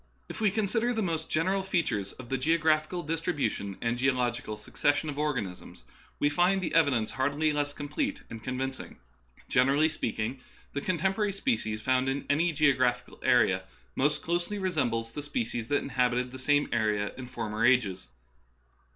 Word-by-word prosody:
If - - -7
we 215 - +4
consider 220 +4 0
the 220 -2 0
most 165 -3 -2
general 190 +5 +1
features 150 - -1
of 130 - -11
the 135 - 0
geographical 160 +3 +2
distribution 145 - -2
and 120 +1 -1
geological 125 -4 0
succes 125 +6 +1
sion 155 0 -2
of 145 - -6
organisms, 125 -12 -3 0.3
we - - +2
find 175 +6 +3
the 185 - -3
evidence 140 -9 +3
hardly 145 +3 +1
less 145 -1 0
complete 270 - -3
and 115 -1 -9
convincing. 130 +2 -4 0.5
Generally 140 +5 +4
speak 155 -7 -3
ing, 115 +5 -2 0.3
the 140 - -2
contemporary 195 +4 0
species 150 - -1
found 130 +1 +2
in 135 +1 -2
an}^ 160 +3 +2
geo 145 -2 +4
graphical 125 0 0
area - - +3 0.3
most 145 +2 +1
closely 175 +4 -1
resemble 155 - 0
the 115 +6 -7
species 120 -5 -3
that 145 - +1
inhabited 125 -1 0
the 130 - -7
same 145 +2 +3
area 105 -2 0
in 130 -1 -7
former 115 -3 -3
ages. 110 -8 +3
145 Hz, 160 wpm, -29 LUFS, 120-165 Hz, 0.5 s, we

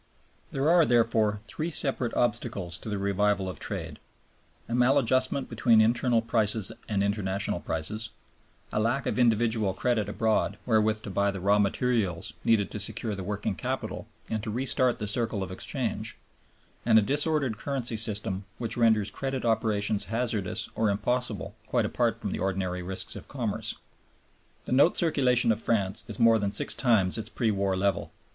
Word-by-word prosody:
There 135 +2 -1
are 175 -1 +6
therefore 115 -5 +2
three 155 +8 -3
separate 135 -6 -2
obstacles 100 -6 -1
to - - -7
the 105 - -2
revival 100 0 +1
of 90 - -6
trade: - - -5 0.7
a - - -4
maladjustment 130 +1 +2
between 115 -1 +3
internal 115 +1 +3
prices 110 -3 +1 0.2
and 100 -2 +1
international 100 -1 -1
prices, 110 +8 -2 0.6
a - - +1
lack 120 +5 0
of - - -1
individual 110 -4 +2
credit 110 -4 0
abroad 110 -1 0
wherewith 110 -1 +2
to 100 - -6
buy 100 +2 +2
the 100 -1 -4
raw 100 +3 +3
materials 105 -2 0
needed 110 -3 +2
to 105 - -4
secure 105 +2 0
the 95 -1 -5
working 100 +1 -2
capital 85 - -4 0.2
and 110 -1 -2
to 110 - -5
re 125 +5 -2
start 130 -2 +3
the 105 - -4
circle 110 -1 -1
of 95 - -6
exchange, 95 - -3 0.7
and 115 -1 +5
a 110 - +6
disordered 145 -3 0
currency 130 -5 -3
system 105 -3 -3
which 115 -1 -4
renders 110 -3 +3
credit 135 -2 -3
operations 110 -2 +1
hazardous 110 -2 -1
or 110 -1 +1
impossible 110 +2 -1
quite - - +1
apart - - 0
from - - -4
the - - -3
ordinary 95 -1 -1
risks 95 +1 -5
of - - -9
commerce. - - -3 0.9
The - - -6
note 140 +7 +5
circulation 130 -8 +3
of 110 0 -1
France 100 -5 0
is - - -6
more 115 -1 +5
than 100 -1 -1
six - - 0
times 110 -6 +2
its 110 0 -5
pre 115 -2 0
war 100 -2 0
level. 100 0 0
110 Hz, 165 wpm, -28 LUFS, 100-120 Hz, 0.9 s, are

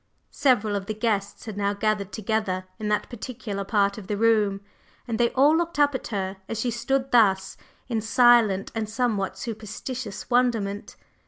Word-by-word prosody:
Several 220 -6 +2
of 195 -1 -4
the 215 - -3
guests 210 -3 -2
had 215 -3 -7
now 200 0 0
gathered 210 -1 -1
together 215 -4 -2
in 215 - -3
that 210 0 0
particular 225 -4 -5
part 200 0 +1
of 195 - -11
the 205 - -2
room, 210 -3 +2 0.5
and 225 -2 -2
they 235 -1 +4
all 285 +4 +5
looked 340 -1 -1
up 290 -1 +4
at 260 - -4
her 195 -3 -3
as 225 - -3
she 240 +2 0
stood 270 +3 -1
thus, 195 -5 +3 0.3
in 230 -3 -1
silent 220 -2 +4
and 220 -2 -3
somewhat 210 -5 -1
superstitious 220 +1 -6
wonderment. 230 -5 0
215 Hz, 170 wpm, -25 LUFS, 200-240 Hz, 0.5 s, all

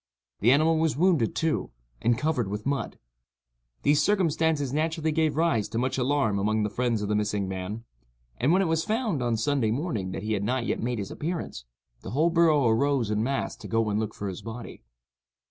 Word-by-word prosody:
The 115 +5 +4
animal 155 +3 +4
was 160 -3 +1
wounded, 165 - +2
too, 160 -1 0 0.3
and 120 0 +2
covered 145 -5 0
with 105 +2 -5
mud. 135 -4 -2 0.9
These 145 +1 +4
circumstances 160 -8 +1
naturally 160 +1 0
gave 155 -1 +1
rise 160 -11 +1
to - - -4
much 130 +2 0
alarm 125 -6 +1
among 110 +2 +1
the 105 - -2
friends 120 -4 0
of - - -2
the 105 - 0
missing 105 -2 0
man; 95 +4 -5 0.6
and 140 - +3
when 190 +2 +4
it - - 0
was 160 0 +1
found, 215 - -1
on 120 -2 0
Sunday 125 0 +1
morning, 115 - -2
that 95 - -5
he 110 0 -1
had 100 -1 -1
not 125 +2 0
yet - - -1
made 120 +1 -1
his 100 -2 -5
appearance, 160 - -4 0.4
the - - -7
whole 155 - +2
borough 160 -5 +4
arose 125 -1 +2
en 105 0 +1
masse 135 +4 -1
to - - -9
go 115 -1 +1
and 105 - 0
look 110 -1 -3
for 100 - -4
his 95 +1 -5
body. 115 +2 -8
125 Hz, 205 wpm, -27 LUFS, 110-155 Hz, 0.9 s, The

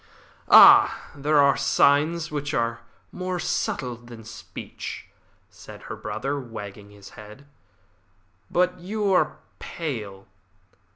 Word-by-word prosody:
"Ah, - - +7
there 150 +2 0
are 140 -1 +5
signs 155 +4 +2
which 145 0 -3
are 115 0 -1 0.3
more 185 0 -4
subtle 125 -6 -2
than 120 -1 -13
speech," 110 - -9 0.5
said - - -13
her - - -7
brother, 140 +1 -4
wagging 105 -5 -9
his 100 -1 -14
head. 110 +6 -14 1.0
"But 180 +1 0
you 200 +2 -2
are - - +1 0.2
pale. 105 - -6
140 Hz, 110 wpm, -24 LUFS, 115-165 Hz, 1.0 s, Ah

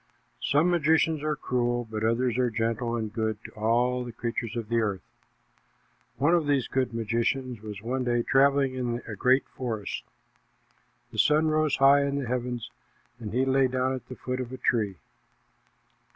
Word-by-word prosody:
Some 155 +5 +3
magicians 160 -2 +2
are 155 0 -1
cruel, 120 -1 -1
but 110 -1 -4
others 115 +1 +1
are 125 -1 +2
gentle 115 +1 -1
and 110 -2 -3
good 110 -2 -1
to - - -9
all 120 +3 +1
the 120 - -7
creatures 115 0 -4
of 115 -2 -4
the 115 +1 +1
earth. 105 -4 -1 1.1
One 145 +7 +3
of 165 -4 +2
these 140 -4 +2
good 130 -1 0
magicians 115 +2 -1
was 105 -1 -8
one 130 +2 -1
day 120 -1 +1
traveling 135 0 +3
in 120 -2 -3
a - - -5
great 130 +1 +3
forest. 110 -5 -4 1.1
The - - -5
sun 155 +1 +4
rose 155 -1 +2
high 140 +1 +6
in 140 0 0
the 140 -3 -2
heavens, 120 -1 -3 0.5
and 110 -3 -6
he 130 +4 +1
lay 135 0 +3
down 130 +1 0
at 130 - -6
the 130 - -8
foot 130 +1 -4
of 125 -1 -6
a 130 - -6
tree. 105 -7 0
125 Hz, 175 wpm, -27 LUFS, 115-135 Hz, 1.1 s, high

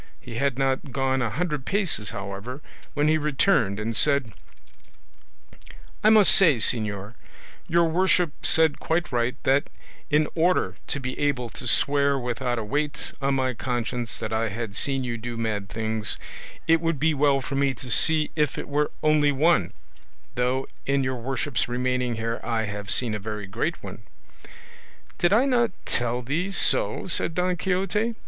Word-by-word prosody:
He 120 -3 -8
had 140 -1 0
not 135 0 -1
gone 135 0 0
a 120 - 0
hundred 150 - -2
paces, 175 - -1
however, 100 +7 -6 0.4
when 145 0 +2
he 155 0 +3
returned 145 - +1
and 110 +1 -3
said: 140 -6 +1 1.7
"I 215 - +6
must 215 -3 +7
say, 165 -9 +6
señor, 105 -2 +1 0.5
your 170 +1 +3
worship 180 -1 +2
said 160 -2 +3
quite 170 +2 -1
right, 120 0 0
that 135 +2 +2 0.4
in 150 0 +3
order 170 - +1
to 145 - -3
be 130 -1 -5
able 130 -5 -1
to 125 - -6
swear 140 +2 +4
without 125 0 -2
a 115 - -2
weight 145 +6 -3
on 135 0 +1
my 130 -1 0
conscience 120 -1 -3
that 110 - -5
I 110 0 0
had 110 -1 -5
seen 135 +2 0
you 120 -2 -4
do 120 +1 -6
mad 105 -4 -3
things, 110 0 -1 0.5
it 165 0 +4
would 165 -2 0
be 160 +2 +2
well 140 -1 +2
for 135 - -6
me 135 -1 +1
to 125 -1 -7
see 155 +3 +3
if 150 -3 0
it - - -5
were 145 +1 0
only 155 -1 +4
one; 140 - +2 0.6
though 125 +2 -1 0.2
in 140 0 +1
your 130 -1 -2
worship's 130 0 -2
remaining 125 0 -1
here 115 +1 -3
I 115 -1 -1
have 105 -1 -6
seen 110 +6 +2
a 105 - -3
very 105 0 -5
great 95 - -3
one." - - -8 1.2
"Did 175 - +2
I 230 +6 +4
not 240 -4 +2 0.2
tell 120 +1 -1
thee 155 +10 -2
so?" 195 - +2
said 170 -2 -1
Don 180 0 +1
Quixote. 195 +5 -1
135 Hz, 170 wpm, -25 LUFS, 115-155 Hz, 1.7 s, must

